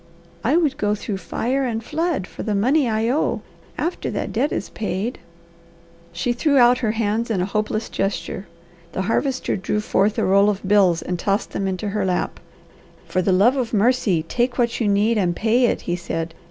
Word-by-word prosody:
"I 280 Hz, +8 st, +3 dB
would 305 Hz, -6 st, +1 dB
go 210 Hz, 0 st, +1 dB
through 210 Hz, -1 st, -4 dB
fire 255 Hz, +7 st, -1 dB
and 230 Hz, -3 st, -2 dB
flood 315 Hz, -, -1 dB
for -, -, -9 dB
the 210 Hz, -2 st, -1 dB
money 255 Hz, +6 st, +2 dB
I 220 Hz, +1 st, 0 dB
owe. 295 Hz, -, 0 dB, 0.4 s
After 340 Hz, +4 st, -2 dB
that -, -, -3 dB
debt 265 Hz, +7 st, +1 dB
is -, -, -3 dB
paid 215 Hz, +3 st, -3 dB, 0.5 s
" 170 Hz, 0 st, -28 dB
She 240 Hz, -, +1 dB
threw 285 Hz, +3 st, +2 dB
out 245 Hz, 0 st, +6 dB
her 220 Hz, -4 st, 0 dB
hands 225 Hz, +1 st, -1 dB
in 215 Hz, -5 st, 0 dB
a 180 Hz, -, +1 dB
hopeless 215 Hz, +2 st, -2 dB
gesture. 195 Hz, -1 st, -3 dB, 0.5 s
The 190 Hz, -, -1 dB
Harvester 255 Hz, +6 st, 0 dB
drew 205 Hz, +2 st, -1 dB
forth 210 Hz, 0 st, +1 dB
a -, -, +1 dB
roll 200 Hz, +2 st, +5 dB
of 200 Hz, -2 st, -3 dB
bills 190 Hz, -5 st, +4 dB
and 180 Hz, -1 st, -3 dB
tossed 200 Hz, +2 st, -1 dB
them 195 Hz, -, -2 dB
into 190 Hz, +2 st, -2 dB
her 205 Hz, 0 st, -1 dB
lap. 180 Hz, -1 st, -1 dB, 0.7 s
"For 185 Hz, -, 0 dB
the 190 Hz, -, +1 dB
love 205 Hz, +8 st, +4 dB
of 240 Hz, -4 st, -1 dB
mercy 210 Hz, -6 st, +2 dB
take 245 Hz, +8 st, -1 dB
what 240 Hz, -1 st, 0 dB
you 220 Hz, -, +2 dB
need 210 Hz, +3 st, +2 dB
and 175 Hz, -3 st, +1 dB
pay 235 Hz, +5 st, +3 dB
it," -, -, 0 dB
he 175 Hz, -, -2 dB
said. 165 Hz, -2 st, -4 dB
215 Hz, 200 wpm, -22 LUFS, 190-245 Hz, 0.7 s, out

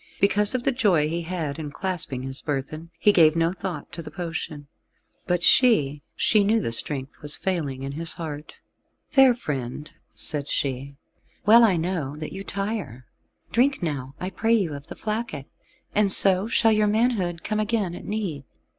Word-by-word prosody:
Because 205 Hz, +3 st, +3 dB
of 250 Hz, -, -1 dB
the 275 Hz, -, +2 dB
joy 195 Hz, -, +2 dB
he 170 Hz, +2 st, -2 dB
had 165 Hz, -3 st, -4 dB
in 150 Hz, -2 st, -5 dB
clasping 155 Hz, -6 st, -3 dB
his 135 Hz, +1 st, -4 dB
burthen, 155 Hz, +3 st, -4 dB
he 205 Hz, -, +4 dB
gave 160 Hz, -3 st, +5 dB
no 165 Hz, +1 st, +1 dB
thought 190 Hz, -1 st, -6 dB
to 170 Hz, -, -7 dB
the 155 Hz, -, -9 dB
potion. 160 Hz, -3 st, -5 dB, 0.6 s
But 175 Hz, -2 st, 0 dB
she 150 Hz, -, +4 dB
she 215 Hz, -2 st, +3 dB
knew 220 Hz, +3 st, +2 dB
the 155 Hz, -, -2 dB
strength 135 Hz, +3 st, -1 dB
was 150 Hz, 0 st, +1 dB
failing 150 Hz, -8 st, -3 dB
in 135 Hz, -, -4 dB
his 165 Hz, +3 st, -1 dB
heart. 150 Hz, -3 st, -7 dB, 0.5 s
"Fair 270 Hz, -4 st, +5 dB
friend," 150 Hz, -, -5 dB, 0.2 s
said 145 Hz, -2 st, -3 dB
she, 140 Hz, +1 st, -3 dB, 0.5 s
"well 230 Hz, +3 st, +7 dB
I 195 Hz, -6 st, +4 dB
know 160 Hz, -5 st, -2 dB
that 155 Hz, 0 st, -7 dB
you 195 Hz, -, -6 dB
tire: 195 Hz, -, -4 dB, 0.5 s
drink 260 Hz, -1 st, +2 dB
now, 140 Hz, -4 st, -4 dB
I 185 Hz, +1 st, -4 dB
pray 225 Hz, +5 st, +2 dB
you, 185 Hz, -9 st, 0 dB
of 140 Hz, +2 st, -9 dB
the -, -, -8 dB
flacket, 215 Hz, -, -4 dB, 0.5 s
and 205 Hz, -1 st, +3 dB
so 190 Hz, +1 st, +6 dB
shall 225 Hz, -1 st, +3 dB
your 215 Hz, -1 st, +3 dB
manhood 205 Hz, -6 st, 0 dB
come 215 Hz, 0 st, -2 dB
again 210 Hz, -4 st, -1 dB
at -, -, -8 dB
need." 190 Hz, -10 st, -4 dB
170 Hz, 175 wpm, -24 LUFS, 145-210 Hz, 0.6 s, well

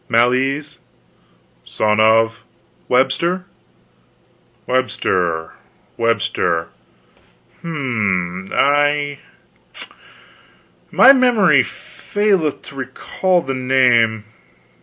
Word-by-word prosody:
"Mal 120 Hz, +2 st, +3 dB
ease." 135 Hz, +4 st, -3 dB, 0.8 s
"Son 105 Hz, -, -1 dB
of?" 110 Hz, +1 st, +3 dB, 0.5 s
"Webster." 170 Hz, +8 st, 0 dB, 1.2 s
"Webster 90 Hz, -10 st, -1 dB, 0.4 s
Webster. 115 Hz, -7 st, -1 dB, 0.9 s
H'm 100 Hz, -, -3 dB
I 145 Hz, 0 st, +1 dB, 1.7 s
my 270 Hz, -, +7 dB
memory 220 Hz, -, +4 dB
faileth 195 Hz, -6 st, -2 dB
to 140 Hz, -, -12 dB
recall 175 Hz, +6 st, -2 dB
the 135 Hz, -, -4 dB
name. 125 Hz, -4 st, +2 dB
130 Hz, 65 wpm, -18 LUFS, 110-150 Hz, 1.7 s, my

